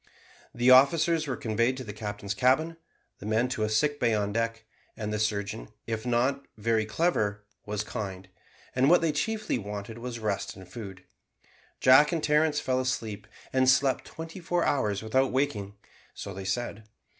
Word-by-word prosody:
The 120 Hz, +2 st, +3 dB
officers 155 Hz, +4 st, +5 dB
were 130 Hz, -3 st, -2 dB
conveyed 115 Hz, +3 st, 0 dB
to 130 Hz, -, -5 dB
the 105 Hz, -3 st, -7 dB
captain's 105 Hz, -1 st, -4 dB
cabin, 135 Hz, +8 st, +2 dB, 0.4 s
the -, -, -9 dB
men 110 Hz, +3 st, +1 dB
to 125 Hz, -, -3 dB
a 110 Hz, -, +1 dB
sick 145 Hz, +7 st, +1 dB
bay 115 Hz, -3 st, +2 dB
on 105 Hz, -1 st, -1 dB
deck; 115 Hz, 0 st, -2 dB, 0.3 s
and 105 Hz, -1 st, -3 dB
the 105 Hz, -, -1 dB
surgeon, 100 Hz, -, -2 dB, 0.2 s
if 110 Hz, +1 st, -3 dB
not 130 Hz, +3 st, +1 dB
very 110 Hz, 0 st, +1 dB
clever, 110 Hz, -7 st, 0 dB, 0.2 s
was 105 Hz, 0 st, -2 dB
kind; 95 Hz, -4 st, -6 dB, 0.5 s
and 130 Hz, +2 st, +4 dB
what 175 Hz, -, +6 dB
they 165 Hz, -2 st, +2 dB
chiefly 215 Hz, -, -1 dB
wanted 105 Hz, +2 st, -6 dB
was 120 Hz, 0 st, -5 dB
rest 105 Hz, -3 st, -2 dB
and 95 Hz, -1 st, -12 dB
food. 95 Hz, -5 st, -9 dB, 0.8 s
Jack 135 Hz, +5 st, +6 dB
and 165 Hz, -3 st, -1 dB
Terence 150 Hz, 0 st, +3 dB
fell 130 Hz, -2 st, 0 dB
asleep, 110 Hz, -5 st, -3 dB, 0.3 s
and 130 Hz, 0 st, +4 dB
slept 135 Hz, 0 st, +3 dB
twenty 165 Hz, +3 st, -8 dB
four 175 Hz, 0 st, 0 dB
hours 105 Hz, -7 st, 0 dB
without 130 Hz, +4 st, +2 dB
waking: 110 Hz, -7 st, -1 dB, 0.4 s
so 100 Hz, -, -6 dB
they 95 Hz, +1 st, -7 dB
said. 110 Hz, +2 st, -3 dB
115 Hz, 170 wpm, -28 LUFS, 105-135 Hz, 0.8 s, what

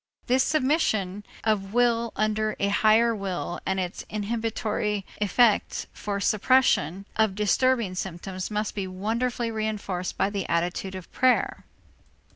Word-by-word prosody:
This 255 Hz, +2 st, +3 dB
submission 220 Hz, -, +1 dB, 0.2 s
of 210 Hz, -1 st, 0 dB
will 235 Hz, -1 st, +2 dB
under 215 Hz, 0 st, 0 dB
a 200 Hz, -, +1 dB
higher 220 Hz, +3 st, +4 dB
will 185 Hz, -3 st, -4 dB
and 190 Hz, 0 st, 0 dB
its 180 Hz, -1 st, -4 dB
inhibitory 215 Hz, -1 st, -2 dB
effect 210 Hz, +1 st, +2 dB
for 200 Hz, -1 st, -3 dB
suppression 200 Hz, -, +2 dB
of 220 Hz, -3 st, +2 dB
disturbing 220 Hz, 0 st, +2 dB
symptoms 185 Hz, 0 st, -5 dB
must 210 Hz, 0 st, -2 dB
be 195 Hz, -2 st, -3 dB
wonderfully 230 Hz, +5 st, -2 dB
reënforced 210 Hz, -4 st, -3 dB
by 195 Hz, -, +1 dB
the 200 Hz, -2 st, -3 dB
attitude 180 Hz, +3 st, -1 dB
of 185 Hz, -2 st, -9 dB
prayer. 255 Hz, -1 st, +2 dB
210 Hz, 125 wpm, -26 LUFS, 190-230 Hz, 0.2 s, higher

